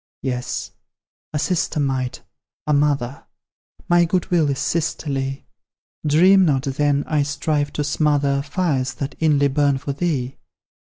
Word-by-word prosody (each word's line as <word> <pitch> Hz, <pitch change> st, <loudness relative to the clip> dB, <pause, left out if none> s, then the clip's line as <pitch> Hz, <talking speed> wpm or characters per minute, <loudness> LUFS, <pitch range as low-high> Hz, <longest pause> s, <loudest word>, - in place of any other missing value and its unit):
Yes 125 Hz, -2 st, -3 dB, 0.6 s
a 150 Hz, -, -2 dB
sister 165 Hz, 0 st, 0 dB
might, 130 Hz, -2 st, -2 dB, 0.4 s
a 150 Hz, -, +1 dB
mother: 140 Hz, -3 st, 0 dB, 0.6 s
My 175 Hz, 0 st, +5 dB
good 180 Hz, +2 st, -1 dB
will 165 Hz, -4 st, +3 dB
is 140 Hz, -, -1 dB
sisterly: 140 Hz, -4 st, -2 dB, 0.6 s
Dream 185 Hz, +6 st, +6 dB
not, 140 Hz, -6 st, +2 dB
then, 145 Hz, +1 st, +1 dB
I 150 Hz, -2 st, +1 dB
strive 145 Hz, 0 st, -1 dB
to 150 Hz, -, -1 dB
smother 145 Hz, -1 st, +1 dB
Fires 140 Hz, -4 st, -1 dB
that 140 Hz, +2 st, -4 dB
inly 145 Hz, -3 st, +3 dB
burn 140 Hz, 0 st, +2 dB
for 140 Hz, +1 st, -4 dB
thee. 140 Hz, -4 st, -2 dB
145 Hz, 130 wpm, -21 LUFS, 135-155 Hz, 0.6 s, Dream